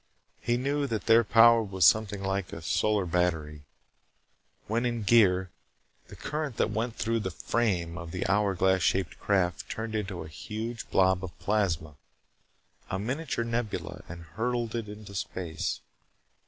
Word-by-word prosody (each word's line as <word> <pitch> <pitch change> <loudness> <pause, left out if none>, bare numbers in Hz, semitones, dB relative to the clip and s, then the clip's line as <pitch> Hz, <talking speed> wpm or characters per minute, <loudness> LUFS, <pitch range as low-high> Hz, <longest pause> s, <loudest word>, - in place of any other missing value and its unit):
He 120 0 0
knew 140 +3 0
that 110 -4 -3
their 115 +1 +6
power 115 +2 +6
was 95 -4 +1
something 105 0 +3
like 95 -1 -2
a 80 - -8
solar 105 +5 +1
battery. 80 -4 -1 1.0
When 115 +3 0
in 120 -2 -1
gear, 95 -4 +4 0.6
the - - -11
current 150 -5 -4
that 105 - +1
went 115 +2 -2
through 115 +3 0
the 95 - -3
"frame" 90 -4 -1
of 85 -1 -7
the 90 +2 -3
hour 100 0 +2
glass 95 +1 +2
shaped 95 0 0
craft 90 -4 0
turned 110 0 -4
it 110 - +1
into 95 -4 -5
a - - -9
huge 110 +9 -6
blob 95 0 +3
of 90 -3 -7
plasma, 85 -8 -1 0.9
a 95 - -1
miniature 125 +3 -2
nebula, 115 -2 -3
and 85 0 -8
hurled 115 +4 -2
it 115 -3 -3
into 105 -1 -10
space. 90 -4 -3
105 Hz, 155 wpm, -28 LUFS, 90-115 Hz, 1.0 s, their